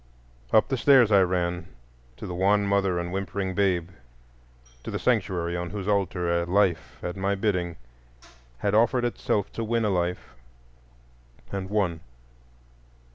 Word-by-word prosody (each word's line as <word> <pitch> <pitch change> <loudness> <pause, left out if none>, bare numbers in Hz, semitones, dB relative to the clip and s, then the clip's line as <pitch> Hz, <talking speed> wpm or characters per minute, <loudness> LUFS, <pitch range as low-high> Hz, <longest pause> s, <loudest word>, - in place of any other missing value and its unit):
Up 110 - +5
the 135 - 0
stairs 125 -4 +5
I 100 -2 +6
ran 90 -1 -1 0.5
to - - -8
the 90 - -5
wan 100 +3 +2
mother 100 -2 +1
and 85 0 -3
whimpering 95 0 -3
babe, 90 -3 +1 0.9
to - - -6
the - - -2
sanctuary 85 -2 0
on 85 0 -3
whose 100 +1 -5
altar 90 -4 0
a - - -1
life 90 -3 +1
at 90 - -4
my 100 +1 0
bidding 90 -4 -1 0.8
had 100 +9 -1
offered 120 +3 +3
itself 105 -4 -1
to 115 - -3
win 115 0 0
a 105 - +1
life, 90 -4 -2 1.2
and 95 -1 -4
won. 95 -6 0
95 Hz, 145 wpm, -26 LUFS, 90-105 Hz, 1.2 s, I